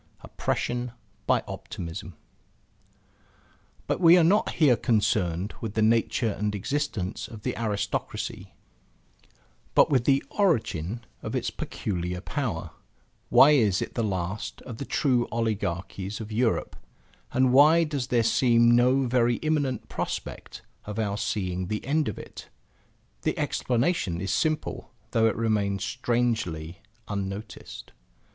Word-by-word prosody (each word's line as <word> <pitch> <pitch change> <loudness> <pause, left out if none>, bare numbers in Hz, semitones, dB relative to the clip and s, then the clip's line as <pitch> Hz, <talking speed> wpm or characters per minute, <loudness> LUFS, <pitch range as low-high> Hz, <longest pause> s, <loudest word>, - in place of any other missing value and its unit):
OPPRESSION 120 0 -2 0.3
BY - - +3
OPTIMISM 85 +2 -7 1.7
But - - -1
we 170 0 +8
are 175 - +5
not 195 +6 +3
here 145 -7 +5
concerned 100 -5 0
with 110 -2 -5
the 110 - +2
nature 115 0 +2
and 105 0 -2
existence 110 -4 -2
of 110 -2 -11
the - - -2
aristocracy, 105 -3 -3 1.2
but - - +5
with 130 -4 +3
the 135 -1 +3
origin 115 - 0 0.2
of - - -4
its - - -1
peculiar 90 -2 -3
power, 105 - -3 0.6
why 145 - +8
is 110 -10 +3
it - - -4
the 120 - -1
last 95 0 -3
of 115 -3 -8
the 140 - -4
true 125 -5 +1
oligarchies 100 -3 -2
of 110 -1 -7
Europe; 115 +1 0 0.6
and 130 0 +3
why 155 +5 +7
does 145 -5 -2
there 120 -3 +2
seem 115 0 +4
no 125 +3 +4
very 120 -1 +2
immediate 145 -6 0
prospect - - -5 0.2
of 105 0 -6
our 105 -3 0
seeing 95 -4 -2
the 105 +2 -3
end 150 +2 +1
of 110 - -3
it? - - -10 0.7
The - - -1
explanation 120 - 0
is 95 0 -2
simple 155 -1 -1 0.2
though 115 -2 +3
it 110 - 0
remains 105 -4 0
strangely 100 -7 -1 0.3
unnoticed. 100 +1 -6
115 Hz, 130 wpm, -26 LUFS, 100-130 Hz, 1.7 s, we